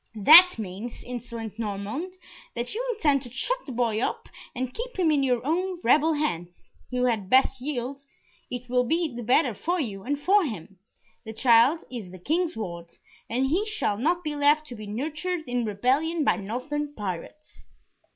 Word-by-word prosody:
"That 325 Hz, -, +9 dB
means, 210 Hz, +3 st, -7 dB
insolent 235 Hz, -3 st, -7 dB
Norman, 210 Hz, -, -4 dB, 0.5 s
that 240 Hz, +1 st, -3 dB
you 465 Hz, +4 st, -2 dB
intend 290 Hz, -9 st, +2 dB
to 245 Hz, -3 st, -10 dB
shut -, -, -2 dB
the -, -, -5 dB
boy 230 Hz, -3 st, 0 dB
up -, -, -2 dB, 0.3 s
and 255 Hz, 0 st, -3 dB
keep -, -, -6 dB
him 345 Hz, -4 st, +3 dB
in 290 Hz, -2 st, +2 dB
your 250 Hz, -2 st, 0 dB
own 360 Hz, +4 st, -1 dB
rebel 305 Hz, +7 st, +4 dB
hands. 175 Hz, -, -4 dB, 0.2 s
You 250 Hz, 0 st, 0 dB
had 220 Hz, -6 st, -1 dB
best 260 Hz, +1 st, +3 dB
yield 270 Hz, 0 st, -4 dB, 0.5 s
it 250 Hz, 0 st, -6 dB
will 250 Hz, 0 st, +2 dB
be 320 Hz, 0 st, 0 dB
the 240 Hz, -, -5 dB
better 245 Hz, +2 st, +3 dB
for 350 Hz, -, -2 dB
you 205 Hz, -9 st, -3 dB
and 285 Hz, +6 st, -2 dB
for 390 Hz, +7 st, +4 dB
him. 200 Hz, -, -6 dB, 0.4 s
The 220 Hz, -, -7 dB
child 240 Hz, +7 st, +4 dB
is 225 Hz, -7 st, -6 dB
the 185 Hz, -, -10 dB
King's 320 Hz, -, -1 dB
ward, 170 Hz, -5 st, -6 dB, 0.4 s
and 250 Hz, +3 st, +1 dB
he 335 Hz, +10 st, +1 dB
shall 410 Hz, -, -1 dB
not 345 Hz, +7 st, +1 dB
be 300 Hz, -2 st, -3 dB
left 295 Hz, +1 st, +3 dB
to 245 Hz, -, -7 dB
be 215 Hz, -2 st, -9 dB
nurtured 310 Hz, -, -3 dB
in 245 Hz, -1 st, -1 dB
rebellion 270 Hz, +10 st, +1 dB
by -, -, +2 dB
northern 290 Hz, +8 st, -4 dB
pirates." 205 Hz, -, -7 dB
255 Hz, 180 wpm, -26 LUFS, 225-310 Hz, 0.5 s, That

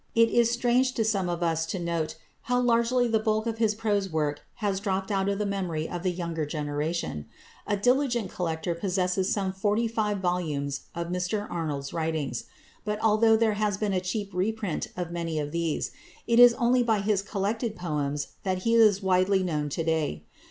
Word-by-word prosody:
It 230 Hz, 0 st, +5 dB
is 235 Hz, 0 st, +3 dB
strange 245 Hz, +2 st, +2 dB
to 225 Hz, -, 0 dB
some 195 Hz, -4 st, 0 dB
of 175 Hz, 0 st, -2 dB
us 165 Hz, -1 st, +1 dB
to 190 Hz, -, -3 dB
note 170 Hz, -3 st, -2 dB, 0.3 s
how 245 Hz, 0 st, +3 dB
largely 245 Hz, 0 st, +3 dB
the 225 Hz, -1 st, +2 dB
bulk 215 Hz, 0 st, 0 dB
of 225 Hz, -1 st, -3 dB
his 215 Hz, -2 st, +2 dB
prose 205 Hz, -3 st, 0 dB
work 150 Hz, -3 st, -1 dB, 0.2 s
has 200 Hz, -3 st, -1 dB
dropped 195 Hz, 0 st, -2 dB
out 195 Hz, 0 st, +1 dB
of 200 Hz, -, 0 dB
the 210 Hz, -, -1 dB
memory 180 Hz, -6 st, -2 dB
of 175 Hz, -, -5 dB
the 185 Hz, -, 0 dB
younger 170 Hz, -3 st, -3 dB
generation. 150 Hz, -, -3 dB, 0.4 s
The 205 Hz, -, +2 dB
diligent 245 Hz, 0 st, +1 dB
collector 165 Hz, -1 st, -2 dB
possesses 185 Hz, +1 st, 0 dB
some 195 Hz, -2 st, 0 dB
forty 210 Hz, +4 st, +1 dB
five 215 Hz, -2 st, -1 dB
volumes 160 Hz, -7 st, -2 dB
of 170 Hz, 0 st, -3 dB
Mr 180 Hz, +4 st, -1 dB
Arnold's 150 Hz, -5 st, -3 dB
writings; 160 Hz, -6 st, -2 dB, 0.4 s
but 210 Hz, 0 st, -2 dB
although 220 Hz, +1 st, +5 dB
there 220 Hz, -1 st, +2 dB
has 205 Hz, -2 st, +1 dB
been 205 Hz, -1 st, -1 dB
a 185 Hz, -, +1 dB
cheap 200 Hz, +2 st, -3 dB
reprint 200 Hz, -1 st, -1 dB
of 175 Hz, -2 st, -3 dB
many 165 Hz, -2 st, -3 dB
of 145 Hz, -1 st, -2 dB
these, 165 Hz, -2 st, -1 dB, 0.3 s
it 235 Hz, 0 st, +3 dB
is 245 Hz, -1 st, +9 dB
only 245 Hz, +1 st, +3 dB
by 225 Hz, -4 st, +2 dB
his 200 Hz, -1 st, +1 dB
collected 215 Hz, +3 st, -2 dB
poems 150 Hz, -5 st, -2 dB
that 185 Hz, -1 st, -2 dB
he 230 Hz, -, +2 dB
is 215 Hz, -4 st, +5 dB
widely 190 Hz, +1 st, +3 dB
known 150 Hz, -4 st, -1 dB
to 165 Hz, +4 st, -2 dB
day. 160 Hz, -, -1 dB
190 Hz, 190 wpm, -27 LUFS, 165-220 Hz, 0.4 s, is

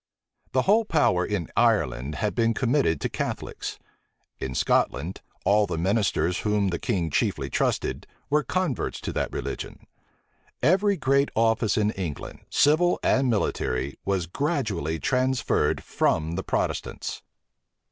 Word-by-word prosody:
The -, -, +3 dB
whole 215 Hz, +4 st, +4 dB
power 150 Hz, -, +2 dB
in 95 Hz, -3 st, -2 dB
Ireland 70 Hz, +5 st, +2 dB
had 105 Hz, +5 st, -1 dB
been 115 Hz, -1 st, +1 dB
committed 120 Hz, -, +2 dB
to -, -, 0 dB
Catholics. -, -, -4 dB, 0.6 s
In 65 Hz, -1 st, -4 dB
Scotland, 85 Hz, +7 st, +1 dB, 0.2 s
all 105 Hz, +1 st, +4 dB
the 85 Hz, -3 st, -3 dB
ministers 90 Hz, -2 st, +1 dB
whom 105 Hz, -2 st, +1 dB
the 85 Hz, -, -2 dB
king 90 Hz, -9 st, -1 dB
chiefly -, -, 0 dB
trusted, -, -, -1 dB, 0.2 s
were 150 Hz, +1 st, +3 dB
converts 180 Hz, -6 st, -2 dB
to -, -, -4 dB
that -, -, -1 dB
religion. -, -, -5 dB, 0.8 s
Every 195 Hz, +7 st, +3 dB
great 140 Hz, -1 st, +2 dB
office 115 Hz, -1 st, +2 dB
in 105 Hz, 0 st, +2 dB
England, 90 Hz, -8 st, -5 dB
civil 165 Hz, +5 st, +3 dB
and 130 Hz, -1 st, +3 dB
military, 70 Hz, -, -1 dB
was 95 Hz, -3 st, 0 dB
gradually 100 Hz, -, -1 dB
transferred 130 Hz, -, +1 dB
from 80 Hz, 0 st, 0 dB
the 90 Hz, +3 st, -2 dB
Protestants. -, -, -2 dB
105 Hz, 130 wpm, -26 LUFS, 85-135 Hz, 0.8 s, whole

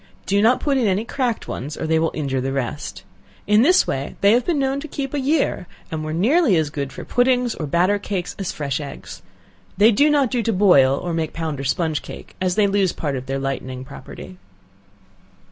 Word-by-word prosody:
Do 200 Hz, +1 st, +2 dB
not 235 Hz, +4 st, +4 dB
put 280 Hz, -2 st, +1 dB
in 235 Hz, -, +2 dB
any 200 Hz, +3 st, 0 dB
cracked 245 Hz, -2 st, -2 dB
ones, 145 Hz, +4 st, -5 dB
or -, -, -3 dB
they 160 Hz, 0 st, +2 dB
will 165 Hz, 0 st, +1 dB
injure 135 Hz, -4 st, -1 dB
the 135 Hz, +1 st, -2 dB
rest. 135 Hz, -3 st, -4 dB, 0.4 s
In 210 Hz, +1 st, +4 dB
this 360 Hz, +9 st, +5 dB
way 135 Hz, +1 st, -3 dB
they 200 Hz, -, +5 dB
have 240 Hz, +2 st, +3 dB
been 340 Hz, -4 st, 0 dB
known 270 Hz, 0 st, 0 dB
to 310 Hz, -, -7 dB
keep 275 Hz, -2 st, -5 dB
a 290 Hz, -, 0 dB
year, 275 Hz, -, 0 dB, 0.2 s
and 155 Hz, -1 st, -3 dB
were 155 Hz, -, -4 dB
nearly 230 Hz, -, +3 dB
as 155 Hz, -3 st, 0 dB
good 140 Hz, -2 st, -4 dB
for -, -, -9 dB
puddings, 245 Hz, -1 st, +2 dB
or 155 Hz, -, -5 dB
batter 180 Hz, +7 st, +2 dB
cakes, 185 Hz, -3 st, -4 dB
as 195 Hz, -, -2 dB
fresh 140 Hz, -2 st, -3 dB
eggs. 140 Hz, -, -9 dB, 0.6 s
They 215 Hz, +4 st, +6 dB
do 285 Hz, +8 st, +4 dB
not 285 Hz, -5 st, +2 dB
do 245 Hz, -, +1 dB
to 225 Hz, 0 st, 0 dB
boil, 140 Hz, -9 st, +5 dB
or 175 Hz, +2 st, -4 dB
make 160 Hz, -1 st, -2 dB
pound 160 Hz, -4 st, -4 dB
or -, -, -4 dB
sponge 155 Hz, +2 st, -1 dB
cake, -, -, -11 dB
as 180 Hz, -1 st, +1 dB
they 210 Hz, -, +4 dB
lose 195 Hz, -2 st, +1 dB
part 145 Hz, -3 st, -3 dB
of 130 Hz, 0 st, -6 dB
their 135 Hz, 0 st, -2 dB
lightening 130 Hz, -1 st, -4 dB
property. 95 Hz, -7 st, -11 dB
185 Hz, 220 wpm, -21 LUFS, 145-245 Hz, 0.6 s, They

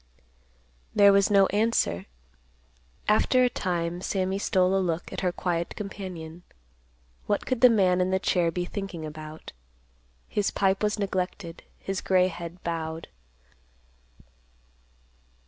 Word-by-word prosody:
There 200 Hz, -1 st, +7 dB
was 200 Hz, 0 st, +4 dB
no 200 Hz, -1 st, +6 dB
answer. 205 Hz, -, +1 dB, 1.0 s
After 255 Hz, +4 st, +4 dB
a 250 Hz, -, +2 dB
time, 175 Hz, -2 st, -2 dB
Sammy 190 Hz, 0 st, -1 dB
stole 185 Hz, -1 st, +2 dB
a 195 Hz, -, +2 dB
look 170 Hz, -2 st, -2 dB
at -, -, -4 dB
her 180 Hz, -2 st, +1 dB
quiet 170 Hz, -1 st, -2 dB
companion. 180 Hz, -5 st, -7 dB, 0.9 s
What -, -, 0 dB
could 255 Hz, -3 st, -2 dB
the 250 Hz, -, +9 dB
man 185 Hz, -5 st, +3 dB
in 180 Hz, -, +1 dB
the 190 Hz, -, +2 dB
chair 175 Hz, -2 st, +1 dB
be 175 Hz, +2 st, -2 dB
thinking 185 Hz, -4 st, -5 dB
about? 155 Hz, 0 st, -9 dB, 0.8 s
His 205 Hz, -1 st, 0 dB
pipe 195 Hz, 0 st, +1 dB
was 210 Hz, 0 st, +1 dB
neglected; 185 Hz, -3 st, -3 dB, 0.2 s
his 195 Hz, 0 st, -4 dB
gray 185 Hz, -1 st, +3 dB
head 170 Hz, 0 st, -8 dB
bowed. 160 Hz, -1 st, -4 dB
185 Hz, 130 wpm, -27 LUFS, 170-200 Hz, 1.0 s, the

